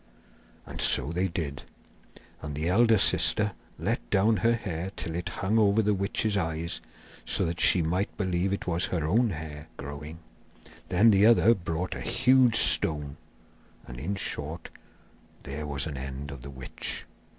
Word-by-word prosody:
And - - -5
so 80 - +3
they 90 +3 0
did; 80 -5 -4 0.8
and 75 -1 -6
the 80 +4 -2
elder 115 +3 +4
sister 105 +1 +3 0.3
let - - -3
down 105 - +3
her 115 0 +2
hair 95 -4 -5
till 80 - -4
it 85 +1 -3
hung 105 +4 0
over 105 +1 +3
the 105 0 +2
witch's 100 +2 -1
eyes, 85 -3 -2 0.4
so - - +1
that 85 +1 -3
she 90 - +5
might 90 +6 -2
believe 95 -1 -1
it 100 - -3
was 85 0 0
her 80 -4 -2
own 115 +9 +2
hair 80 -3 -7
growing. 75 +3 -8 0.7
Then 105 +5 +5
the 100 +1 +5
other 115 0 +6
brought 85 -3 -4
a - - -7
huge 125 -2 +3
stone, 75 -9 +2 0.7
and, - - -9
in 90 +9 -3
short, 80 -3 -5 0.7
there 75 +2 -6
was 70 -1 -2
an 75 -4 -5
end 70 +2 -6
of 70 -3 -9
the 70 - -9
witch. 65 -1 -3
85 Hz, 160 wpm, -27 LUFS, 75-100 Hz, 0.8 s, other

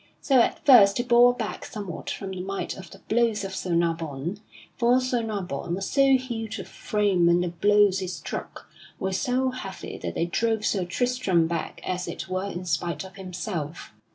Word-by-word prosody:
So 270 -3 +3
at - - -1
first 210 -8 +8
he 240 - +1
bore 245 0 +5
back 225 -4 -4
somewhat 200 -6 -6
from 195 -1 -5
the 185 -1 -5
might 195 +1 -4
of 190 -4 -10
the - - -14
blows 225 -2 +2
of 195 0 -5
Sir 180 -2 -1
Nabon. 165 +1 -1 0.4
For 245 +1 +4
Sir 255 -2 0
Nabon 185 -7 -3
was 195 +1 -4
so 275 -1 +5
huge 225 -4 -5
of - - -7
frame 200 -5 +1
and 175 +1 +4
the 180 - -1
blows 205 +2 +3
he 185 - -3
struck 180 - -6 0.3
were 190 0 -2
so 255 +5 +1
heavy 200 -7 -7
that - - -5
they 170 - +1
drove 220 +4 0
Sir 190 -4 +1
Tristram 200 -4 +1
back 165 -1 -4
as 180 0 -2
it - - -5
were 185 +1 -2
in 180 -1 -6
spite 170 +2 -1
of 190 - -12
himself. 180 - -5
195 Hz, 190 wpm, -26 LUFS, 175-235 Hz, 0.4 s, first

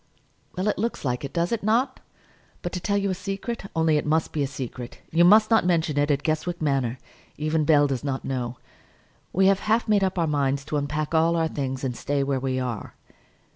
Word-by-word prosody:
"Well, 185 +3 0
it 210 - 0
looks 230 -7 -2
like 125 0 -1
it, 140 - -5
does 170 0 0
it 230 - 0
not? 240 +6 +1 0.6
But, 175 - -3
to 180 - -3
tell 200 +3 0
you 200 -1 0
a - - 0
secret, 195 +4 -5
only 160 -1 +3
it - - -1
must 160 +1 +1
be 150 - -2
a 140 - +1
secret; 125 -3 -7
you 170 +2 +4
must 215 +5 +6
not 225 - +5
mention 165 -4 +1
it 145 +1 +2
at 145 -1 +1
Guestwick 160 +2 -1
Manor; 135 -5 0 0.4
even 155 0 0
Bell 145 -1 +5
does 135 -3 -2
not 135 -2 -3
know; 125 -2 -3 0.7
we 190 +2 +3
have 195 0 +4
half 220 +3 +1
made 210 -2 +3
up 190 0 0
our 170 - +2
minds 140 -2 0
to 150 - -2
unpack 150 +2 -2
all 165 +1 +3
our 165 -1 +2
things 135 -4 -4
and 125 -2 -2
stay 140 +3 -1
where 135 -1 0
we 130 0 -1
are." 125 -4 -4
155 Hz, 220 wpm, -25 LUFS, 140-185 Hz, 0.7 s, must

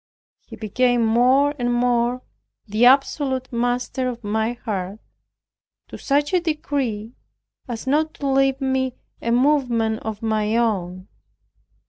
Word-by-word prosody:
He - - -9
became 240 +2 +1
more 255 +6 +3
and 245 0 0
more 245 0 +1 0.4
the 220 +3 +3
absolute 265 -1 +2
master 245 +2 -1
of 240 -1 -7
my 220 +3 -1
heart, 205 -4 -5 0.9
to - - -9
such 290 +3 0
a 365 - +4
degree 275 -9 -2 0.5
as 235 -1 -6
not 305 +4 +1
to 285 - -6
leave 270 0 +2
me 265 -2 -1 0.3
a 235 - -2
movement 240 -4 +2
of 220 0 -6
my 220 0 0
own. 185 -5 -1
245 Hz, 125 wpm, -22 LUFS, 220-265 Hz, 0.9 s, a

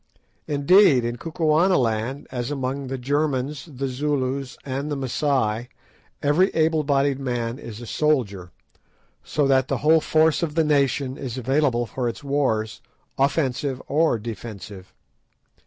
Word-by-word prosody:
Indeed, 145 - +5
in 120 0 -3
Kukuanaland, 150 - +1
as 125 -1 -3
among 135 -1 -3
the 135 +1 -3
Germans, 140 +2 -1
the 135 0 -3
Zulus, 135 -1 -2
and 140 +2 -3
the - - 0
Masai, 130 -4 -1 0.5
every 160 +7 +3
able 160 -1 +2
bodied 140 -1 +1
man 120 -2 -3
is 115 -5 -8
a - - -7
soldier, 115 - 0 0.7
so 150 - 0
that 135 -1 +3
the 135 - -1
whole 160 +1 +6
force 160 0 +3
of 160 -3 -2
the 165 - +3
nation 140 -3 +1
is 130 -3 -5
available 130 -1 +1
for 120 +1 -2
its 115 - -8
wars, 130 -6 -1 0.4
offensive 135 -1 0
or 155 -3 +2
defensive. 105 -3 -8
135 Hz, 135 wpm, -23 LUFS, 120-150 Hz, 0.7 s, whole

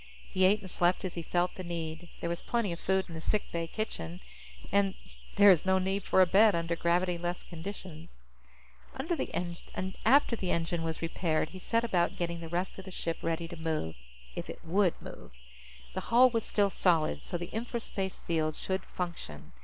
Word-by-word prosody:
He 185 0 +4
ate 205 +3 +4
and 190 - -8
slept 175 +2 +2
as 180 - -3
he 170 - -4
felt 175 +2 0
the 185 - -7
need. 165 -1 -5
There 170 - -1
was 170 - -3
plenty 235 -5 0
of 170 - -4
food 190 0 +1
in 170 - -9
the 160 - -6
sick 210 +4 0
bay 165 -1 -2
kitchen, 90 - -4 0.5
and 195 0 +3 0.4
there 200 0 +9
is 170 -5 +4
no 190 0 +3
need 190 +1 -1
for 190 - +6
a - - +5
bed 205 +3 +6
under 170 0 0
gravity 175 +1 +1
less 175 +1 -3
conditions. 170 - -8 0.8
After 320 +6 0 1.2
the 190 - -4
engine 170 0 0
was 165 0 -3
repaired, 165 -1 0
he 185 - -9
set 230 +5 +1
about 180 -7 +1
getting 170 -1 -2
the 165 -1 -7
rest 180 +3 -2
of 190 - -9
the - - -7
ship 165 -2 -3
ready 165 0 -1
to 170 - -8
move 160 - -2 0.4
if - - -6
it - - -8
would 180 +1 +2
move. - - -10 0.6
The - - -2
hull 250 +2 +6
was 230 -2 0
still 200 -2 +2
solid, 160 - +2
so 175 - -3
the 175 0 -6
infraspace 220 -4 -3
field 155 -2 0
should 190 0 -2
function. 170 - -6
175 Hz, 195 wpm, -31 LUFS, 165-190 Hz, 1.2 s, there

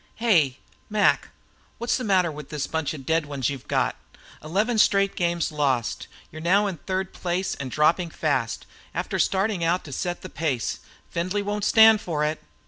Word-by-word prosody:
"Hey, 165 - +3 0.3
Mac, 210 -1 +3 0.5
what's 235 +1 0
the 255 - -2
matter 185 -6 +2
with 150 -1 -9
this 150 -2 -2
bunch 160 -2 -2
of 135 -3 -10
dead 160 0 +1
ones 140 -3 -1
you've 135 -3 -8
got? - - +1 0.5
Eleven 210 +9 0
straight 200 -2 +3
games 170 -2 0
lost! 130 -9 -1 0.2
You're 155 - -8
now 195 +5 +3
in 195 -4 -3
third 190 +4 -3
place, 180 +1 -2
and 140 -2 -5
dropping 165 +5 +2
fast, 135 -8 -1 0.3
after - - -2
starting 195 -2 +1
out 175 +2 +1
to 145 - -10
set 175 +6 -3
the - - -5
pace. 140 -10 -2 0.3
Findlay 185 +4 -1
won't 205 0 -2
stand 220 -1 +7
for 150 -3 -1
it." 155 +1 -2
170 Hz, 175 wpm, -25 LUFS, 150-195 Hz, 0.5 s, stand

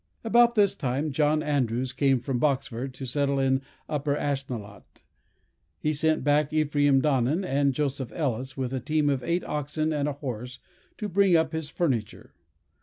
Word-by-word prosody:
"About 235 +1 +4
this 205 -3 +4
time, 140 +2 -2
John 150 +2 +2
Andrews 130 -3 0
came 135 -3 +2
from 125 +1 -2
Boxford 135 -2 -1
to 135 - -6
settle 140 +2 0
in 135 0 +2 0.3
Upper 145 -1 -1
Ashnelot. 130 -8 -5 0.7
He 155 - -1
sent 155 +1 +2
back 145 0 +2
Ephraim 145 -3 +3
Donnan 145 +5 +1
and 140 -2 +2
Joseph 135 -3 -2
Ellis 130 -4 -2
with 130 -1 -3
a 130 - -1
team 145 +3 +1
of 135 -2 -1
eight 170 +6 -1
oxen 150 +2 -2
and 145 -1 0
a - - -3
horse, 125 -3 -6 0.4
to 210 - -3
bring 195 -1 +3
up 160 0 +2
his 160 -2 -3
furniture. 130 -10 -2
145 Hz, 165 wpm, -26 LUFS, 130-155 Hz, 0.7 s, About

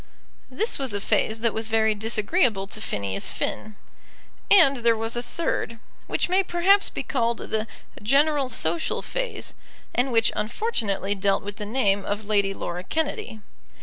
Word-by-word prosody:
This 410 - 0
was 260 -6 -2
a - - 0
phase 220 +2 0
that 230 -2 +2
was 220 0 -1
very 220 -1 +2
disagreeable 215 - +1
to 215 +2 -5
Phineas 100 - -2
Finn. 215 -1 -4 0.7
And 325 -9 +6
there 235 -1 +2
was 225 +1 -1
a 240 - -1
third, 245 -4 -3 0.3
which - - 0
may 370 +2 +3
perhaps 385 +2 +4
be - - -5
called 235 -4 0
the 220 0 -2 0.3
general 280 +4 +2
social 330 +5 0
phase, - - -4 0.4
and 255 +2 +1
which 230 -1 +3
unfortunately 210 - -1
dealt 195 0 0
with 205 0 -7
the 210 - -5
name 205 -4 +1
of 205 +2 -3
Lady 200 -2 +2
Laura 175 -1 -5
Kennedy. 285 -6 -3
225 Hz, 155 wpm, -24 LUFS, 205-275 Hz, 0.7 s, And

